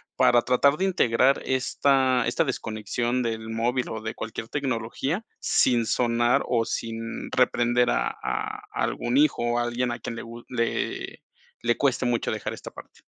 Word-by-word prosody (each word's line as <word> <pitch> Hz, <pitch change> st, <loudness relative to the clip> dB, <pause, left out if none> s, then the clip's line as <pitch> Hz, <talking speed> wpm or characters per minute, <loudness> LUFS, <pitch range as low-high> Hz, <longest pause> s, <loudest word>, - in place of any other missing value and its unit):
para 120 Hz, -, +5 dB
tratar 140 Hz, +4 st, +3 dB
de 190 Hz, -, +1 dB
integrar 135 Hz, -7 st, +3 dB
esta 130 Hz, -1 st, +2 dB
esta 120 Hz, -, +2 dB
desconexión 120 Hz, -1 st, -2 dB
del 110 Hz, -1 st, -3 dB
móvil, 120 Hz, +3 st, -1 dB
o 110 Hz, -, -5 dB
de 110 Hz, 0 st, -4 dB
cualquier 110 Hz, 0 st, -6 dB
tecnología, 135 Hz, -, -2 dB
sin 120 Hz, -3 st, +2 dB
sonar, 120 Hz, 0 st, +2 dB
o 115 Hz, -2 st, +1 dB
sin 115 Hz, 0 st, -4 dB
reprender 120 Hz, -1 st, +2 dB
a -, -, +1 dB
a -, -, -4 dB
algún 120 Hz, +2 st, -1 dB
hijo, 150 Hz, 0 st, +3 dB
o 120 Hz, 0 st, +1 dB
alguien 120 Hz, +1 st, -1 dB
a 120 Hz, -, -4 dB
quien 115 Hz, -, -5 dB
le 115 Hz, -, -5 dB
gu 115 Hz, 0 st, -10 dB
le 115 Hz, -2 st, -2 dB, 0.4 s
le 120 Hz, 0 st, +1 dB
cueste 135 Hz, -2 st, +1 dB
mucho 120 Hz, -1 st, 0 dB
dejar -, -, -3 dB
esta -, -, -8 dB
parte? -, -, -14 dB
120 Hz, 160 wpm, -25 LUFS, 115-130 Hz, 0.4 s, para